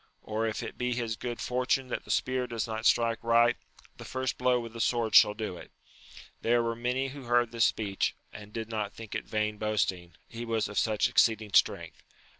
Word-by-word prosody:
or 110 +1 -1
if 110 - -3
it - - -8
be 125 0 0
his 115 -2 -2
good 120 +1 -5
fortune 125 +1 0
that - - -4
the - - -16
spear 130 -1 0
does 115 -2 -2
not 110 -1 -1
strike 115 -1 +2
right, 120 +1 +4 0.4
the - - -9
first 130 -1 -3
blow 125 0 +2
with 115 -1 -7
the 115 - -4
sword 115 -2 +1
shall 105 0 +7
do 105 -5 -4
it. - - -12 0.7
There 120 0 +2
were 115 0 -1
many 125 +3 -1
who 135 -1 -9
heard 120 -1 +2
this 115 -1 +3
speech, 100 -3 0 0.2
and 105 -1 -10
did 110 0 -5
not 105 -2 -3
think 115 -2 -9
it - - -3
vain 105 -1 -1
boasting, 95 -5 -1
he 115 0 -7
was 115 -2 -1
of 105 - -1
such 110 -2 +2
exceeding 110 -3 +2
strength. - - +2
115 Hz, 210 wpm, -29 LUFS, 110-120 Hz, 0.7 s, shall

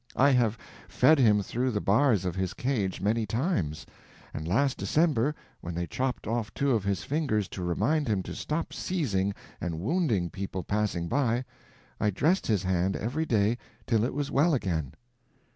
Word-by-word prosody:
I 140 +2 +5
have 120 -4 +2 0.3
fed 155 -1 +4
him 105 -5 +4
through 125 +6 -1
the 105 -4 -1
bars 105 -1 +3
of 90 - -1
his 95 -1 -2
cage 105 -9 -1
many 110 +2 +1
times; 100 - -1 0.5
and 80 +1 -5
last 135 +9 +2
December, 150 -3 +2 0.2
when 85 -1 -6
they 85 +1 -1
chopped 130 +6 -2
off 115 -1 -2
two 140 0 +1
of 110 -5 +2
his 100 -1 -1
fingers 130 - 0
to 95 - -6
remind 110 - +1
him 100 -4 0
to - - -6
stop 155 +2 -3
seizing 105 - -1 0.3
and 80 -2 -3
wounding 110 - 0
people 95 -1 -4
passing 100 -3 -1
by, 125 +2 +1 0.5
I 105 - +2
dressed 160 - +1
his 105 -4 +1
hand 95 +1 +1
every 145 +9 -2
day 110 +1 +2 0.3
till 110 -3 +2
it 125 - -1
was 145 -1 -2
well 155 +3 +3
again." 80 - -2
110 Hz, 175 wpm, -28 LUFS, 95-135 Hz, 0.5 s, I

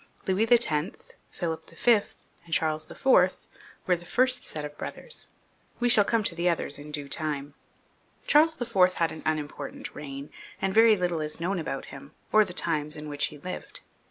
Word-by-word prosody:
Louis 195 +4 +2
X., 185 -8 +2 0.2
Philip 165 -3 -4
V., 240 - +2 0.5
and 170 - -16
Charles 155 -1 0
IV., - - -13
were 185 -4 +2
the 175 - -10
first 255 +7 +2
set 150 -1 -5
of 145 0 -8
brothers; 485 - -7 0.5
we 245 0 +2
shall 215 -3 +6
come 225 +1 +1
to 185 - 0
the 170 +1 +1
others 155 -4 -1
in 145 +1 -10
due 145 -1 -5
time. 145 -1 -2 0.7
Charles 315 +1 +4
IV. 195 -7 +3
had 165 -2 0
an 160 - -8
unimportant 150 -2 -4
reign, 140 0 -7 0.3
and 195 0 0
very 225 0 +6
little 175 -3 -1
is 150 +1 -3
known 180 +2 -1
about 135 -4 -4
him, 140 - -11 0.2
or 215 0 +7
the 190 - -6
times 150 -3 -1
in 150 0 -7
which 145 -1 +2
he 150 - -10
lived. 185 +6 -7
170 Hz, 180 wpm, -27 LUFS, 150-210 Hz, 0.7 s, or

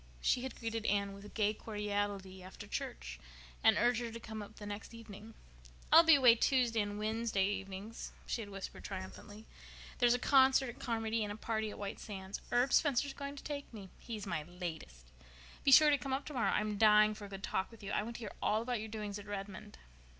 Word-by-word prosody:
She 245 - +2
had 260 -1 -5
greeted 225 -1 -3
Anne 200 0 +1
with 200 +1 -11
gay 210 -1 +2
cordiality 205 -3 -3
after 185 0 -10
church, - - -5 0.4
and - - +6
urged 245 0 +3
her 235 -1 -4
to 230 - -7
come 220 -1 -7
up 205 - -10
the 205 - -9
next 205 +3 -7
evening. 225 -1 -11 0.6
"I'll 325 - +11
be 325 -2 +7
away 255 -4 +7
Tuesday 235 -2 +2
and 205 0 -3
Wednesday 215 -2 0
evenings," 195 +2 -5
she 235 - -2
had 205 - -8
whispered 195 -1 -7
triumphantly. 205 +2 -8 0.5
"There's 245 -1 +5
a - - +1
concert 265 0 +4
at 235 - -10
Carmody 225 -2 -1
and 205 - -3
a - - -5
party 220 0 -2
at - - -8
White 200 +1 -5
Sands. 195 -2 -7
Herb 245 +2 +2
Spencer's 285 -2 +3
going 280 0 -6
to 280 - -10
take 285 -1 -5
me. 200 -5 -10
He's 220 -3 -6
my 170 -5 -2
latest. 160 - -7 0.6
Be 275 - +4
sure 300 +3 +9
to 285 - +3
come 265 +1 -3
up 275 +2 -2
tomorrow. 265 -6 0
I'm 210 -1 -1
dying 215 -1 +6
for 210 -1 -9
a - - -10
good 195 0 -8
talk 190 - -1
with 225 -2 -15
you. 200 - -5
I - - +1
want 230 +3 -6
to - - -7
hear 210 - -6
all 215 +2 +1
about 245 -1 -1
your 220 +1 -6
doings 210 -1 -5
at 205 - -11
Redmond." 205 +1 -7
215 Hz, 215 wpm, -34 LUFS, 200-235 Hz, 0.6 s, I'll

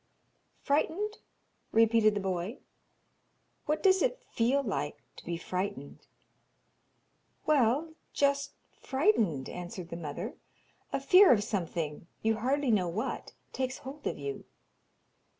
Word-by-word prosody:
'Frightened?' 340 +9 0 0.5
repeated 225 -1 +4
the - - 0
boy. 190 +4 -2 1.1
'What 305 +1 0
does 380 -1 +5
it - - 0
feel 255 +5 +2
like 195 - -2 0.2
to - - -11
be 170 -1 -2
frightened?' 180 -5 -4 1.4
'Well 295 +2 +3 0.2
just 280 0 +1 0.2
frightened,' 230 - +1
answered 175 0 -7
the - - -5
mother. 150 -4 -5 0.6
'A - - -1
fear 390 -1 +7
of 210 -4 +4
something, 170 -6 -3 0.2
you 225 0 +2
hardly 265 +3 +1
know 190 -5 +3
what, 180 +6 -3 0.2
takes 260 0 -2
hold 280 +3 -7
of - - -2
you.' 140 -1 -5
225 Hz, 115 wpm, -30 LUFS, 180-285 Hz, 1.4 s, fear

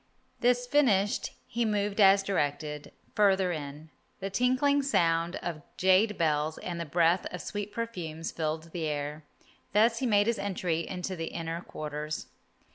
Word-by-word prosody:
This 245 0 +2
finished 230 -8 +2 0.2
he 235 +1 -1
moved 210 -1 0
as 195 0 +7
directed, 150 -5 -2 0.2
further 190 -3 +3
in. 150 0 -6 0.3
The 195 0 -4
tinkling 255 +5 +3
sound 170 -10 +1
of 170 -3 -4 0.2
jade 190 +3 +4
bells 155 -1 +1
and 175 -2 -5
the 170 - -3
breath 170 +3 +2
of 180 - -5
sweet 205 +3 -5
perfumes 175 -9 -4
filled 160 0 -3
the 165 -2 -2
air. 150 +1 -4 0.5
Thus 225 +3 +4
he 260 - 0
made 205 -2 +4
his 230 0 0
entry 180 -4 -1
into 185 0 -4
the 165 -1 -4
inner 165 +1 -4
quarters. 150 -2 -5
180 Hz, 150 wpm, -29 LUFS, 160-210 Hz, 0.5 s, as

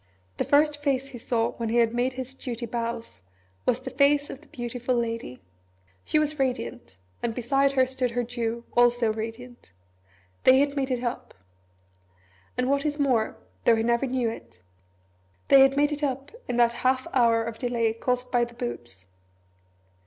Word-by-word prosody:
The - - +1
first 295 0 +3
face 275 -2 0
he 250 -3 -9
saw 230 -1 0
when 230 -1 -2
he 235 - +1
had 230 -1 +3
made 245 +2 0
his 260 0 -6
duty 245 -3 -5
bows 230 - -3 0.5
was 250 +1 +2
the - - -6
face 285 +1 +3
of 270 - -9
the 310 - -20
Beautiful 245 0 -3
Lady. 230 - -3 0.6
She - - +2
was 305 -1 +1
radiant: 250 - -3 0.2
and 230 -2 -2
beside 270 +3 +2
her 260 -1 +4
stood 255 -1 -1
her 245 +1 -1
Jew, 235 -1 -3
also 240 -2 +4
radiant. 225 - -7 0.7
They 260 - +7
had 285 +1 +2
made 275 -2 -1
it 250 -1 -1
up. 240 0 -4 1.2
And 250 0 +1
what 280 +1 +1
is 295 -1 -1
more 255 -7 +1 0.3
though 235 - +6
he 225 - 0
never 235 +3 +1
knew 250 -2 0
it 90 - -8 0.9
they 275 - +8
had 270 +1 +5
made 290 +1 +3
it 295 0 -3
up 275 -1 -2 0.2
in 245 - -2
that 235 -1 +4
half 260 0 +2
hour 230 -3 +4
of 230 -1 -6
delay 235 -3 0
caused 250 +2 -2
by 245 -1 +3
the 240 0 -6
Boots. 120 - -6
245 Hz, 175 wpm, -26 LUFS, 230-270 Hz, 1.2 s, they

